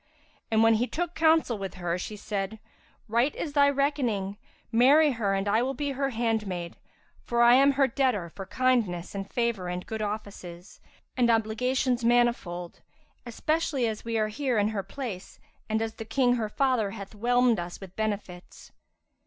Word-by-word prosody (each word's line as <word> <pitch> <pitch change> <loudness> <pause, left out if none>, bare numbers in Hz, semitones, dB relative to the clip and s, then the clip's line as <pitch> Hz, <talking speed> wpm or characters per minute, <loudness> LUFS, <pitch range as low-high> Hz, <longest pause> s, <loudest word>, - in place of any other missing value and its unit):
And 220 0 +3
when 225 0 +6
he 230 +3 +1
took 345 +4 -3
counsel 320 -9 +3
with 195 -2 -5
her, 175 -2 -2
she 210 - -5
said, 205 0 -4 0.5
"Right 235 +6 +1
is 295 - -4
thy 285 -1 +5
recking; 260 -9 0 0.4
marry 280 +6 +5
her 210 -5 0
and 195 +1 -2
I 215 +3 +3
will 265 +2 -1
be 285 +2 -2
her 275 0 -1
handmaid; 215 -8 -2 0.5
for 235 0 +2
I 240 0 +7
am 275 +2 +5
her 275 0 +3
debtor 250 -8 0
for 195 +2 -8
kindness 230 -9 0
and 195 -1 -5
favour 235 -6 -1
and 180 0 -4
good 220 -1 -5
offices, 200 -3 -6 0.3
and 245 -2 +2
obligations 240 +3 +1
manifold, 235 -8 +1 0.5
especially 285 +1 0
as 220 -1 -4
we 230 -1 -2
are 215 -1 +1
here 255 +1 -1
in 205 0 +2
her 215 -2 -2
place 200 -2 -7 0.3
and 220 +1 +1
as 225 0 -4
the 225 - -8
King 245 +2 +2
her 225 -3 -1
father 255 -4 +1
hath 200 +1 -9
whelmed 240 +1 +2
us 175 0 -6
with 190 -2 -11
benefits." 205 -5 -5
225 Hz, 170 wpm, -27 LUFS, 200-255 Hz, 0.5 s, I